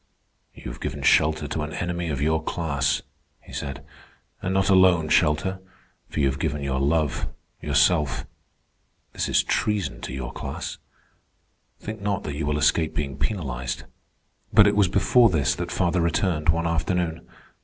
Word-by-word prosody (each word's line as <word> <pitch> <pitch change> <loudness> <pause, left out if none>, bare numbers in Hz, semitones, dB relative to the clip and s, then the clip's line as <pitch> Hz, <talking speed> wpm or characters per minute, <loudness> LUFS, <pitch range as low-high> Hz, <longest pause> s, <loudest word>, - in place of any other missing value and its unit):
"You - - -7
have - - -10
given - - -4
shelter 75 -1 +3
to 80 - -3
an 75 +1 -4
enemy 85 -1 -3
of 70 -2 -2
your 80 +1 +2
class," 75 -3 -1 0.4
he - - -15
said. 70 -1 -5 0.6
"And 95 - -2
not 95 0 +2
alone 95 -5 +5
shelter, 95 +7 +2 0.5
for - - -4
you 70 - +3
have 70 0 0
given 75 0 -2
your 65 -1 -1
love, 75 0 +1 0.3
yourself. 75 +1 +2 0.9
This - - -2
is - - +3
treason 90 - -1
to - - -6
your 65 -1 -5
class. - - -5 1.0
Think 110 0 -7
not 100 -1 -1
that 75 - -4
you 75 0 -3
will 75 0 0
escape 80 +1 +2
being 70 -4 -2
penalized." 70 - -3 0.7
But 105 - +7
it 100 - +3
was 100 -2 +4
before 115 +6 +4
this 80 -7 +1
that - - -5
father 90 0 +1
returned 85 -2 0
one 85 +1 +2
afternoon. 85 0 -1
80 Hz, 160 wpm, -24 LUFS, 70-90 Hz, 1.0 s, But